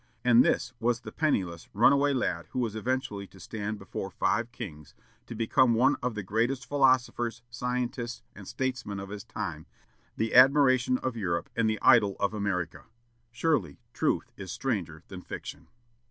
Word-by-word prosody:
And 125 0 +7
this 115 - 0
was 120 +1 +1
the - - -8
penniless, 95 - -1
runaway 140 +6 +5
lad 130 -2 -1
who - - -1
was 115 -4 -1
eventually 110 -3 -2
to 95 - -18
stand 110 +1 -4
before 95 -3 -6
five 120 0 0
kings, 75 - -9 0.3
to 115 - -7
become 120 +2 +3
one 130 +5 +4
of 125 -2 -2
the 105 - -4
greatest 115 +7 0
philosophers, 125 -4 +1
scientists, 125 0 -3
and - - -11
statesmen 125 -6 -3
of 100 0 -7
his 105 0 -7
time, - - -6 0.5
the 110 0 -1
admiration 130 -1 +6
of 130 -1 -3
Europe 85 -6 -2
and 115 -1 +2
the 110 - 0
idol 100 -2 +6
of 100 +1 0
America. 100 -5 -3 0.5
Surely, 120 - 0 0.2
truth - - 0
is 95 -3 -7
stranger 95 -8 -3
than 95 -1 -8
fiction. 80 -2 -8
115 Hz, 160 wpm, -28 LUFS, 100-130 Hz, 0.5 s, And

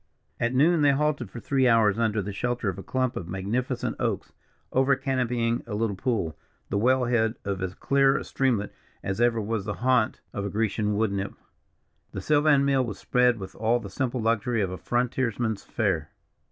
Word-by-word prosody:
At 120 +2 0
noon, 160 +5 +4
they 145 -1 +5
halted 145 -5 0
for 120 - -8
three 130 +1 +1
hours 115 -3 +4
under 110 -3 +1
the 100 +1 -5
shelter 120 +1 -1
of 95 - -5
a - - -5
clump 130 -1 -1
of 85 - -5
magnificent 115 +7 -2
oaks - - -2 0.4
over 135 +1 +3
canopying 120 -3 0
a 105 - -4
little 110 -2 0
pool, 95 -6 -1 0.3
the 100 - 0
well 130 +3 +3
head 115 -1 +1
of 100 -1 -2
as 95 0 -3
clear 135 0 +3
a - - -4
streamlet 120 -7 0 0.3
as 95 +4 -2
ever 120 -1 +3
was 110 -1 -2
the 105 - -3
haunt 125 -4 +2
of 100 -1 -3
Grecian 105 -1 0
woodnymph. 100 -3 -1 0.8
The - - -4
sylvan 145 -2 +4
meal 135 -2 +3
was 105 -5 -5
spread 125 -1 +2
with 95 -2 -8
all 115 +2 +1
the 100 -4 -9
simple 130 +3 -2
luxury 115 0 +1
of 95 - -2
a 95 - -5
frontiers 120 -1 -1
man's 110 -4 -1
fare. - - -1
115 Hz, 190 wpm, -26 LUFS, 105-130 Hz, 0.8 s, they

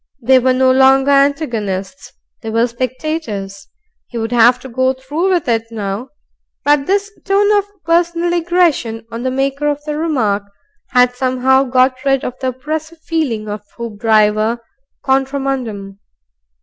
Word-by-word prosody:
They 260 +1 +4
were 255 +1 +2
no 260 0 +3
longer 265 +1 +4
antagonists; 275 -7 0 0.3
they 225 - -5
were 230 +1 +2
spectators. 245 -5 -4 0.4
He 240 - -7
would 225 0 -3
have 240 +1 +5
to 265 - -9
go 260 +1 +1
through 290 +8 -2
with 355 -6 +1
it 225 -1 +1
now. 215 +2 -4 0.6
But 290 -1 +3
this 405 +1 0
tone 410 +1 +3
of 405 -1 +2 0.2
personal 340 +1 +1
aggression 335 -10 +1
on 230 +1 -5
the 260 - -1
maker 275 +2 -1
of 295 0 -1
the 300 0 -4
remark 245 -11 0 0.5
had 250 -1 +3
somehow 260 +1 +2
got 255 +1 +2
rid 270 -1 +1
of 250 - -3
the 260 - -1
oppressive 310 +6 -4
feeling 260 -10 -1
of 210 -1 -5 0.2
Hoopdriver 215 0 +1 0.5
contra 270 +1 +1
mundum. 220 -8 -4
260 Hz, 150 wpm, -16 LUFS, 230-295 Hz, 0.6 s, have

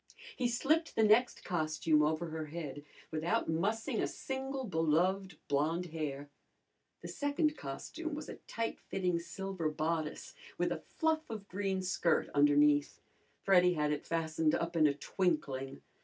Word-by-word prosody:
He 250 - +1
slipped 305 +7 +1
the 220 - +4
next 220 +4 +4
costume 155 -2 +2
over 155 +2 +1
her 160 -1 -4
head 150 -2 -6 0.3
without 160 +2 0
mussing 205 +8 0
a - - +1
single 265 0 -4
beloved 180 0 +1
blonde 155 +5 +1
hair. 145 -3 -3 0.8
The - - -5
second 295 +2 0
costume 300 - -5
was 305 0 -6
a - - -7
tight 230 0 -3
fitting 180 -3 -1
silver 180 -1 -3
bodice 155 0 -2 0.2
with - - +1
a - - -3 0.2
fluff 320 -1 +1
of 215 -3 -6
green 195 -1 -1
skirt 180 -2 +1
underneath. 145 0 +4 0.4
Freddy 180 -2 +5
had 150 -2 0
it 150 - -3
fastened 160 -1 +1
up 170 +1 -2
in 155 -2 +5
a 140 - +1
twinkling. 145 -5 -1
170 Hz, 145 wpm, -33 LUFS, 155-210 Hz, 0.8 s, Freddy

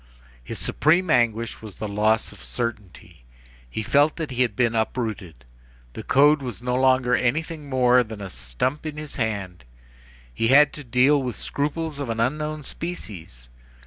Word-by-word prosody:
His - - -6
supreme 170 +3 +2
anguish 115 -3 +1
was 110 -3 -9
the 110 - -5
loss 105 +2 +1
of - - -14
certainty. 105 - -6 0.5
He 110 - -4
felt 145 +6 +3
that 160 -4 -5
he 125 0 -1
had 120 -5 +1
been 120 -1 +2
uprooted. 110 - -3 0.5
The - - -6
code 145 +2 +4
was 125 -5 -6
no 125 0 -2
longer 130 -1 +3
anything 150 +4 -1
more 125 -1 +4
than 110 -2 -9
a 100 - -6
stump 95 - -3
in 150 -1 -6
his 150 -1 -6
hand. 100 - -3 0.7
He 115 - 0
had 140 +3 +6
to 150 - -8
deal 130 +4 +3
with 125 -3 -3
scruples 150 +1 -3
of 140 -4 -4
an 115 0 -2
unknown 150 +5 -1
species. 95 - -7
125 Hz, 165 wpm, -24 LUFS, 110-145 Hz, 0.7 s, had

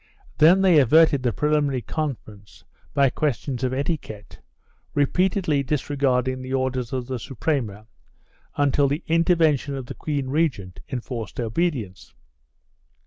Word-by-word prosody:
Then 175 +5 +6
they 180 -5 +6
averted 150 +2 +5
the 125 -2 +1
preliminary 145 -2 0
conference 115 -10 -6 0.3
by 140 -2 +4
questions 135 -3 -2
of 130 - 0
etiquette, 130 -7 -4 0.6
repeatedly 175 +1 +1
disregarding 130 -2 0
the 130 +1 -3
orders 130 -2 -2
of 130 -2 -3
the 130 -1 -4
Suprema, 120 -6 -3 0.7
until 145 0 +2
the 145 +5 -2
intervention 160 -4 +2
of 135 -2 -5
the - - -7
queen 140 -4 -3
regent 130 - -1
enforced 120 -5 -5
obedience. 115 - -3
135 Hz, 120 wpm, -23 LUFS, 125-150 Hz, 0.7 s, Then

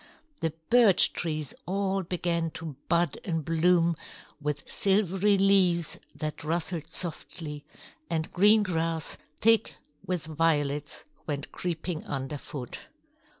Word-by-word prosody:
The 165 - 0 0.2
birch 235 -6 +6
trees 155 -4 -3
all 195 +1 0
began 170 -2 -1
to 160 -3 -6
bud 170 0 +2
and 165 -5 -2
bloom 170 +1 +3 0.5
with 145 -1 -2
silvery 195 0 +2
leaves 185 -4 +3 0.2
that 155 0 -4
rustled 165 0 -2
softly; 155 -2 -5 0.4
and 160 -1 -2
green 210 +3 +6
grass, 165 -3 -2 0.2
thick 225 0 +4 0.3
with 180 -3 -3
violets, 150 -2 0 0.2
went 145 -2 -3
creeping 170 -1 -3
underfoot. 135 -1 -5
165 Hz, 105 wpm, -28 LUFS, 155-185 Hz, 0.5 s, birch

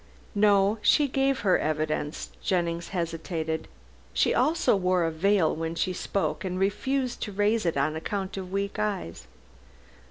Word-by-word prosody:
"No; 205 +1 +3
she 285 +7 +4
gave 270 0 +1
her 190 -3 +3
evidence." 155 0 -2
Jennings 170 -2 -1
hesitated. 165 -2 -3 0.5
"She 70 - +3
also 295 -2 +3
wore 180 -2 +2
a 165 - 0
veil 180 +1 +2
when 165 +1 -3
she 185 +2 0
spoke, 195 +1 -2
and 185 -1 -3
refused 255 +6 -1
to 210 - -3
raise 205 0 +1
it 165 - 0
on 150 +3 +1
account 190 +4 -3
of 185 -1 -6
weak 200 +2 -2
eyes. 180 - -3
190 Hz, 150 wpm, -27 LUFS, 165-205 Hz, 0.5 s, she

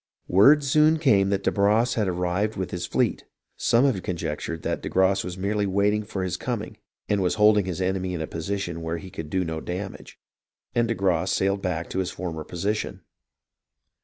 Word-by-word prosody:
Word 140 +11 +6
soon 150 +3 +4
came 105 -11 +3
that 100 0 0
de - - +2
Barras 105 +4 +2
had 105 -3 0
arrived 90 +4 -1
with 95 -1 -3
his 90 0 -3
fleet 120 +1 0 0.3
(some 120 +3 +3
have 120 -9 +1
conjectured 80 -2 -4
that - - -2
de - - -4
Grasse 95 +1 +2
was 90 +1 -6
merely 100 +2 0
waiting 100 +2 +2
for 100 -3 -4
his 90 -2 -2
coming - - -4 0.3
and 100 -1 +1
was 90 - +1
holding 105 -2 +5
his 90 -2 -4
enemy 95 -1 -1
in 80 - -4
a - - -2
position 85 0 -4
where 80 +1 -3
he 95 +2 -10
could 80 -2 -7
do 95 +2 0
no 80 -1 -4
damage), 95 +3 -6 0.6
and 120 -1 +2
de 115 - -1
Grasse 95 -2 +1
sailed 100 +1 +1
back 85 -3 -2
to 95 - -2
his 95 - -1
former 80 -4 -5
position. 100 +6 -3
95 Hz, 195 wpm, -25 LUFS, 90-105 Hz, 0.6 s, Word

